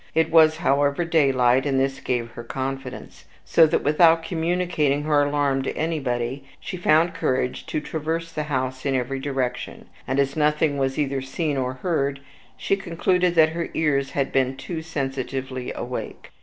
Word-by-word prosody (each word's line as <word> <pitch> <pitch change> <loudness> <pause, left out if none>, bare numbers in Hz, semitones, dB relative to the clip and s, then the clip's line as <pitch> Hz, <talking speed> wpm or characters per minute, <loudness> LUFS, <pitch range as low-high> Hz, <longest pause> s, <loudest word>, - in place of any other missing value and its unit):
It 160 0 +2
was, 155 -1 +6
however, 145 0 +1
daylight, 135 -5 +3
and 135 -1 +1
this 135 0 0
gave 120 -2 -2
her 120 0 -8
confidence; 130 +1 -6 0.2
so 165 -1 +5
that, 155 - 0
without 165 +2 +4
communicating 165 -4 0
her 150 -1 +3
alarm 145 -2 +1
to 135 - -4
anybody, 135 -5 -2 0.2
she 185 - -6
found 170 -1 +3
courage 130 -6 -1
to - - -1
traverse 160 +2 -3
the 150 -2 -3
house 130 -1 -2
in 135 -2 0
every 130 +1 -2
direction; 135 -2 -3 0.2
and, 130 +2 0
as 140 0 +1
nothing 150 -1 +1
was 135 0 -1
either 140 -2 -1
seen 145 +3 -2
or 130 -1 -1
heard, 140 -6 0 0.4
she - - +1
concluded 180 -1 0
that 160 -1 +6
her 165 +1 -4
ears 140 -3 0
had 140 -1 -1
been 135 0 +1
too 165 -3 -5
sensitively 135 -4 -4
awake. - - -6
145 Hz, 165 wpm, -23 LUFS, 135-160 Hz, 0.4 s, was